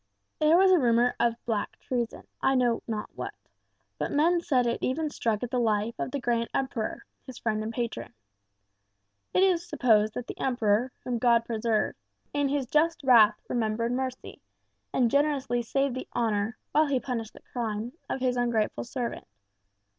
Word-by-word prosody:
There 310 Hz, +2 st, +5 dB
was 380 Hz, +1 st, +6 dB
a 365 Hz, -, +6 dB
rumour 240 Hz, -1 st, +4 dB
of 235 Hz, -1 st, +3 dB
some -, -, -40 dB
black 220 Hz, -3 st, -2 dB
treason, 240 Hz, -3 st, -3 dB, 0.2 s
I 270 Hz, -, +3 dB
know 245 Hz, -2 st, +2 dB
not 215 Hz, -2 st, -4 dB
what, -, -, -6 dB, 0.6 s
but -, -, -2 dB
men 335 Hz, +4 st, +3 dB
said 255 Hz, -7 st, +2 dB
it 235 Hz, -, -1 dB
even 300 Hz, +4 st, -1 dB
struck 225 Hz, -4 st, -1 dB
at 245 Hz, -, -4 dB
the 250 Hz, -, +1 dB
life 220 Hz, -1 st, +1 dB
of 230 Hz, -, -2 dB
the 280 Hz, -, -3 dB
great 235 Hz, -2 st, 0 dB
Emperor, 255 Hz, -5 st, -2 dB, 0.2 s
his 260 Hz, -2 st, -8 dB
friend 215 Hz, -2 st, -1 dB
and 215 Hz, +1 st, -3 dB
patron. 235 Hz, 0 st, -4 dB, 1.2 s
It 370 Hz, -, +3 dB
is 360 Hz, -3 st, +3 dB
supposed 220 Hz, -8 st, +3 dB
that 245 Hz, -, -4 dB
the -, -, -8 dB
Emperor 240 Hz, -1 st, +1 dB
(whom 245 Hz, -2 st, -2 dB
God 235 Hz, -1 st, +4 dB
preserve!), 225 Hz, -1 st, 0 dB, 0.4 s
in 285 Hz, -1 st, +1 dB
his 280 Hz, -1 st, 0 dB
just 320 Hz, +5 st, +1 dB
wrath 235 Hz, -5 st, +6 dB
remembered 230 Hz, 0 st, -1 dB
mercy, 255 Hz, 0 st, -4 dB, 0.5 s
and 240 Hz, -3 st, +2 dB
generously 280 Hz, -4 st, +1 dB
saved 275 Hz, +3 st, 0 dB
the 255 Hz, -, -5 dB
honour, 220 Hz, -1 st, 0 dB
while 310 Hz, 0 st, +4 dB
he 275 Hz, -2 st, +1 dB
punished 230 Hz, -3 st, -4 dB
the -, -, -14 dB
crime, 230 Hz, 0 st, -3 dB, 0.2 s
of 265 Hz, -, -3 dB
his 250 Hz, -1 st, +1 dB
ungrateful 235 Hz, -3 st, 0 dB
servant. 240 Hz, 0 st, -4 dB
245 Hz, 175 wpm, -28 LUFS, 230-270 Hz, 1.2 s, was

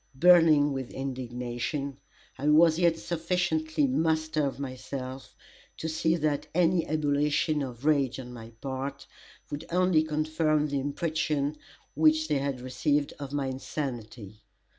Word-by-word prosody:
Burning 155 Hz, -2 st, +6 dB
with 135 Hz, -2 st, -4 dB
indignation, 130 Hz, +1 st, -4 dB, 0.4 s
I 145 Hz, -, -3 dB
was 160 Hz, +1 st, +5 dB
yet 170 Hz, -2 st, +3 dB
sufficiently 165 Hz, -3 st, 0 dB
master 155 Hz, +2 st, +1 dB
of 135 Hz, -, -5 dB
myself 130 Hz, 0 st, -6 dB, 0.4 s
to 160 Hz, -, -4 dB
see 160 Hz, +1 st, +1 dB
that 150 Hz, -3 st, -1 dB
any 175 Hz, -1 st, +3 dB
ebullition 150 Hz, 0 st, +1 dB
of 125 Hz, -1 st, -6 dB
rage 140 Hz, -5 st, +2 dB
on 125 Hz, -1 st, -8 dB
my 115 Hz, -2 st, -9 dB
part, 135 Hz, +1 st, -4 dB, 0.5 s
would 145 Hz, +2 st, -4 dB
only 180 Hz, -2 st, +3 dB
confirm 155 Hz, 0 st, +1 dB
the 140 Hz, -2 st, -1 dB
impression 150 Hz, 0 st, -1 dB, 0.4 s
which 155 Hz, +1 st, +3 dB
they 145 Hz, -2 st, +2 dB
had 135 Hz, -2 st, -3 dB
received 145 Hz, +3 st, 0 dB
of 140 Hz, -2 st, -6 dB
my 145 Hz, -1 st, -1 dB
insanity. 120 Hz, -6 st, -5 dB
145 Hz, 130 wpm, -28 LUFS, 135-155 Hz, 0.5 s, Burning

